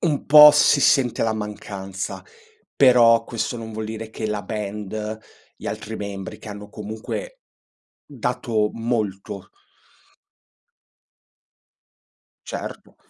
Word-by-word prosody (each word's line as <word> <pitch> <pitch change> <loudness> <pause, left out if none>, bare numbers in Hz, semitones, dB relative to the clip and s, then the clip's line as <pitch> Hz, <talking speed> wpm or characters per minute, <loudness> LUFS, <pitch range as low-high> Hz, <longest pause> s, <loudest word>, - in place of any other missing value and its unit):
un 150 -4 0
po' 150 +1 +10
si 145 -1 +4
sente 130 -4 +3
la 110 - +1
mancanza. 100 -3 -6 0.5
Però 120 -3 +6
questo 115 +1 -3
non 110 -1 -7
vuol 110 0 -4
dire 110 0 -6
che 110 - -4
la 105 -1 -3
band, 105 +1 -5 0.4
gli - - -10
altri 105 +1 -5
membri 100 +1 -6
che - - -11
hanno 105 0 -8
comunque 110 - -7 0.7
dato 120 -4 -1
molto 105 -5 -3 3.0
Certo, - - -7
110 Hz, 105 wpm, -22 LUFS, 105-120 Hz, 3.0 s, po